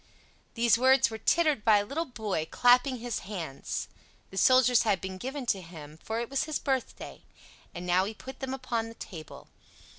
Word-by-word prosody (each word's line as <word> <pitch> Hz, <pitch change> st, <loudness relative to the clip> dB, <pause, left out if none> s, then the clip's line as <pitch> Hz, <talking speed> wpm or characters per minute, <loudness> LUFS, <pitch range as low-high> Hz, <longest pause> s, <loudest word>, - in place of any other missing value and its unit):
These 230 Hz, -1 st, +3 dB
words 260 Hz, -1 st, +4 dB
were 220 Hz, -, -6 dB
tittered 305 Hz, -2 st, +2 dB
by 215 Hz, -2 st, +6 dB
a 205 Hz, -, 0 dB
little 315 Hz, +9 st, -3 dB
boy, 210 Hz, -, -3 dB
clapping 250 Hz, +2 st, +4 dB
his 240 Hz, -1 st, -4 dB
hands; 160 Hz, -, -5 dB, 0.4 s
the -, -, -11 dB
soldiers 255 Hz, +2 st, +5 dB
had 205 Hz, -4 st, +1 dB
been 190 Hz, 0 st, -6 dB
given 265 Hz, +3 st, -5 dB
to 200 Hz, -5 st, 0 dB
him, 160 Hz, -3 st, -11 dB
for 225 Hz, +1 st, -3 dB
it 235 Hz, -, -3 dB
was 275 Hz, +3 st, -1 dB
his 310 Hz, -2 st, -2 dB
birthday; 265 Hz, -2 st, -3 dB, 0.5 s
and 175 Hz, +1 st, -7 dB
now 180 Hz, +1 st, +3 dB
he 215 Hz, +2 st, -6 dB
put 265 Hz, +4 st, -10 dB
them 265 Hz, -1 st, -4 dB
upon 240 Hz, -4 st, -3 dB
the 230 Hz, -, -12 dB
table. 160 Hz, -9 st, -10 dB
230 Hz, 185 wpm, -29 LUFS, 190-260 Hz, 0.5 s, by